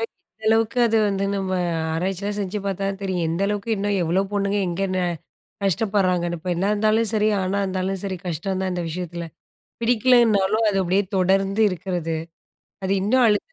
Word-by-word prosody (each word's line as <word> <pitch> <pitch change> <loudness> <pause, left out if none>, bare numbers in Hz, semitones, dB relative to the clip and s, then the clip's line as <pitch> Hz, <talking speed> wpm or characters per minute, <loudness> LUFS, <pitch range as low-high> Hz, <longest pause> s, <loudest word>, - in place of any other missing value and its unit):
எந்த 225 -1 -9
அளவுக்கு 225 +2 +2
அது 225 -1 +2
வந்து 200 -1 0
நம்ம 195 -1 -2 0.4
ஆராய்ச்சிலாம் 195 +4 -2
செஞ்சு 200 +1 -2
பார்த்தா 195 0 -2
தான் 195 0 -4
தெரியும். 185 -4 -1
எந்தளவுக்கு 200 +5 -1
இன்னும் 200 0 0
எவ்ளோ 170 +3 +1
பொண்ணுங்க 200 0 0
எங்க 175 +3 -2
ந - - +1 0.7
கஷ்டப்படுறாங்கனு, 185 -3 +1
பெண்ணா 180 +2 0
இருந்தாலும் 215 +1 +2
சரி, 215 0 +2
ஆணா 190 +2 -1
இருந்தாலும் 190 0 -2
சரி, 190 -2 -3
கஷ்டம்தான் 190 +3 -2
இந்த 180 -1 -2
விஷயத்துல. 170 0 -5 0.6
பிடிக்கலைனாலும் 225 -3 +3
அது 195 - -2
அப்படியே 190 +3 +2
தொடர்ந்து 195 +3 +2
இருக்கறது. 175 -3 -3 0.7
அது 190 - -1
இன்னும் 250 +5 +3
அழுத்தம் 210 - 0
195 Hz, 150 wpm, -23 LUFS, 185-210 Hz, 0.7 s, பிடிக்கலைனாலும்